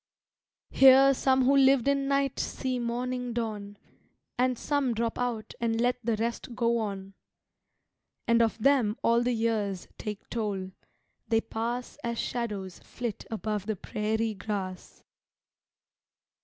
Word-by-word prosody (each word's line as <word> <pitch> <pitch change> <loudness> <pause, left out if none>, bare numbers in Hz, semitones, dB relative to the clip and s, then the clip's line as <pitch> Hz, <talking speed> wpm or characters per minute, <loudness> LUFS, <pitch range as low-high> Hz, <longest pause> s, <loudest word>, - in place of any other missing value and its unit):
Here 270 +1 +7
some 260 0 +2
who 275 +2 +4
lived 270 -2 +5
in 275 -1 +2
night 275 -1 +1
see 255 -2 -2
morning 245 +1 -2
dawn 210 -3 -4 0.6
And 255 -1 +1
some 275 -4 0
drop 230 0 -2
out 235 -3 -2
and 225 -1 0
let 245 +1 +1
the 230 0 +1
rest 235 +2 -3
go 235 -1 +1
on. 195 -2 -4 1.1
And 235 0 +4
of 225 -1 +1
them 235 -3 +3
all 235 +1 +4
the 245 +1 +1
years 220 -5 -1
take 210 -1 -6
toll; 200 -5 -2 0.6
they 225 -1 +2
pass 235 +4 -4
As 235 0 -2
shadows 205 -8 -3
flit 235 -4 -6
above 215 -2 -3
the 220 - -1
prairie 220 +3 -2
grass. 190 -2 -5
235 Hz, 130 wpm, -28 LUFS, 215-250 Hz, 1.1 s, Here